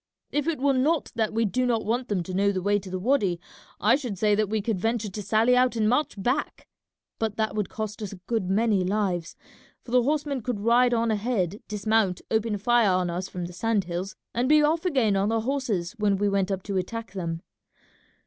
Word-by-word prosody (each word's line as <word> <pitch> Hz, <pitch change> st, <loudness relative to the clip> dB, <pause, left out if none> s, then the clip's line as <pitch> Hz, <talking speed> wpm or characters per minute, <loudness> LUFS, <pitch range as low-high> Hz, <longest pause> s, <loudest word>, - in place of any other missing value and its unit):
If 295 Hz, 0 st, -1 dB
it 330 Hz, -2 st, 0 dB
were 275 Hz, +1 st, +3 dB
not 290 Hz, +5 st, +1 dB
that 220 Hz, -2 st, 0 dB
we 225 Hz, +1 st, +1 dB
do 250 Hz, +5 st, 0 dB
not 235 Hz, -4 st, 0 dB
want 240 Hz, +4 st, -1 dB
them 190 Hz, -4 st, -1 dB
to 185 Hz, -, -7 dB
know 200 Hz, +2 st, +2 dB
the 185 Hz, -2 st, -3 dB
way 205 Hz, +1 st, +2 dB
to 190 Hz, -, -10 dB
the 185 Hz, -, -3 dB
wady 200 Hz, -5 st, +1 dB, 0.4 s
I 215 Hz, +5 st, +4 dB
should 250 Hz, -8 st, -4 dB
say 210 Hz, +2 st, +2 dB
that 210 Hz, -1 st, +1 dB
we 220 Hz, 0 st, 0 dB
could 210 Hz, -2 st, -1 dB
venture 225 Hz, 0 st, -1 dB
to 210 Hz, -, -5 dB
sally 220 Hz, +5 st, +3 dB
out 250 Hz, -1 st, +3 dB
and 215 Hz, -2 st, +1 dB
march 255 Hz, +7 st, +1 dB
back, 250 Hz, +9 st, -2 dB, 0.5 s
but 220 Hz, -2 st, -1 dB
that 220 Hz, -2 st, -1 dB
would 210 Hz, -2 st, -2 dB
cost 215 Hz, 0 st, -5 dB
us 210 Hz, -, -4 dB
a -, -, -7 dB
good 220 Hz, -6 st, -1 dB
many 205 Hz, -1 st, +2 dB
lives, 185 Hz, -3 st, -1 dB, 0.5 s
for 235 Hz, -, -10 dB
the 250 Hz, 0 st, +5 dB
horsemen 285 Hz, 0 st, -1 dB
could 235 Hz, -2 st, -3 dB
ride 240 Hz, +2 st, +4 dB
on 230 Hz, 0 st, +1 dB
ahead, 205 Hz, -3 st, -1 dB
dismount, 210 Hz, -2 st, +1 dB
open 220 Hz, -1 st, +1 dB
fire 235 Hz, +1 st, +3 dB
on 180 Hz, -1 st, +1 dB
us 180 Hz, +2 st, -4 dB
from 180 Hz, -1 st, -5 dB
the 175 Hz, -, -8 dB
sand 210 Hz, +2 st, 0 dB
hills, 180 Hz, +2 st, -5 dB, 0.2 s
and 245 Hz, +3 st, 0 dB
be 305 Hz, 0 st, +6 dB
off 320 Hz, +4 st, +1 dB
again 255 Hz, -, +2 dB
on 195 Hz, +2 st, +1 dB
their 225 Hz, 0 st, +1 dB
horses 230 Hz, -9 st, -1 dB
when 205 Hz, -2 st, +2 dB
we 205 Hz, +1 st, +1 dB
went 195 Hz, -1 st, +1 dB
up 190 Hz, -1 st, -2 dB
to 200 Hz, -2 st, -2 dB
attack 225 Hz, +4 st, -4 dB
them. 170 Hz, -3 st, -4 dB
215 Hz, 225 wpm, -26 LUFS, 195-240 Hz, 0.5 s, be